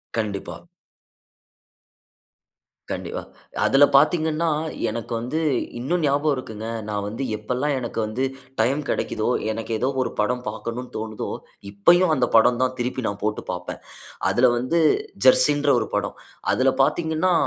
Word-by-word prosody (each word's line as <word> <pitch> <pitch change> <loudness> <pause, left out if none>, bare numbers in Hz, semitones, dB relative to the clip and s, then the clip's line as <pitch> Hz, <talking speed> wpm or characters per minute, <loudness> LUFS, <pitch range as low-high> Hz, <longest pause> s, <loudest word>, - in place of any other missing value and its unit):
கண்டிப்பா. 105 -3 -3 2.3
கண்டிப்பா. - - -4 0.4
அதில 135 +1 +5
பார்த்தீங்கனா, 160 +2 +3 0.4
எனக்கு 115 +1 -5
வந்து 125 +7 -2 0.4
இன்னும் 165 +6 -1
ஞாபகம் 145 +1 +2
இருக்குங்க. 110 -3 -6 0.2
நான் 100 -1 -2
வந்து 115 +6 -4
எப்பல்லாம், 125 +7 -1
எனக்கு 120 -2 -4
வந்து 115 +5 -2 0.4
டைம் 135 +6 +1
கிடைக்குதோ, 110 +2 -1 0.2
எனக்கு 115 +1 -5
ஏதோ 130 - +1
ஒரு - - -1
படம் 125 +4 0
பார்க்கனுன்னு 115 +3 -6
தோணுதோ, 110 0 -4 0.4
இப்பயும் 170 - +4
அந்த 125 -2 +2
படம் 120 +2 +5
தான் 130 0 +1
திருப்பி 125 +1 -2
நான் 100 0 -4
போட்டு 105 0 -1
பார்ப்பேன். 90 0 -6 0.5
அதில 125 +1 +4
வந்து, 145 +7 +1 0.5
"ஜெர்சி"ன்ற 150 - +5
ஒரு 110 - -3
படம். 100 0 -1 0.4
அதில 130 +1 +3
பார்த்தீங்கன்னா, 160 +4 +1
125 Hz, 125 wpm, -23 LUFS, 110-150 Hz, 2.3 s, அதில